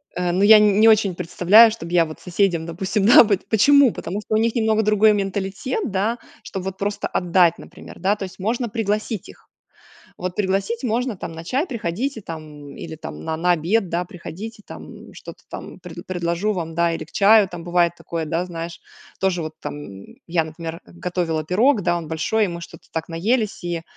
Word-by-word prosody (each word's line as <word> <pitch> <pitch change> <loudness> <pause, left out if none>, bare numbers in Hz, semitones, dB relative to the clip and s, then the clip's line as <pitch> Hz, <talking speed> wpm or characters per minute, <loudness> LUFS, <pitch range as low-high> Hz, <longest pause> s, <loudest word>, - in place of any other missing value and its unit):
э, 180 -1 0
ну 185 +3 0
я 215 +1 +9
не 210 +1 +5
очень 210 -4 +3
представляю, 210 +7 +5
чтобы 175 -6 -7
я 170 -2 +5
вот 155 - -10
соседям, 180 -2 0
допустим. 190 +4 -2
Да, 235 - +9
вот, 200 -3 -1
почему? 275 +3 +5
Потому 195 +5 -5
что 215 - -2
у - - +4
них 230 +2 +1
немного 220 -1 +2
другой 215 +1 +4
менталитет, 200 - -3
да. 210 +5 0 0.3
Что, 190 - -5
вот 190 0 -5
просто 205 +1 -2
отдать, 175 -1 +2
например, 180 - -13
да. 195 +2 +2
То 205 - -7
есть 185 - -9
можно 230 +4 -1
пригласить 215 -1 -2
их. - - -17 0.7
Вот 180 0 -4
пригласить 195 +4 -1
можно, 245 0 -1
там, 165 - -6
на 165 +1 -8
чай. 265 - 0
Приходите 235 - -3
там, 150 -4 -9
или 160 -1 -8
там 80 - -9
на 160 - -3
на 180 +2 +2
обед, 180 +5 +1
да, 175 +1 -1
приходите, 210 +4 -9
там. - - -11
Что-то - - -12
там - - -9
пред - - -10
предложу 175 +3 -1
вам, 165 -3 -5
да, 170 0 +2
или 155 - -5
к - - -22
чаю 210 0 +5
там. 175 -1 -8
Бывает 175 0 +2
такое, 165 -1 -4
да, 165 +3 -1
знаешь 170 -1 -7 0.4
тоже, 185 -3 +1
вот 155 0 -6
там 100 -10 -8 0.2
я 165 -1 +1
например 165 +1 -7
готовила 170 -3 -3
пирог, 215 - +2
да 175 -1 +1
он 165 -2 -6
большой, 205 +7 +1
и - - -2
мы 170 0 -6
что-то - - -12
так 160 - -4
наелись 210 +5 -1
и 170 -1 -3
185 Hz, 200 wpm, -21 LUFS, 170-215 Hz, 0.7 s, я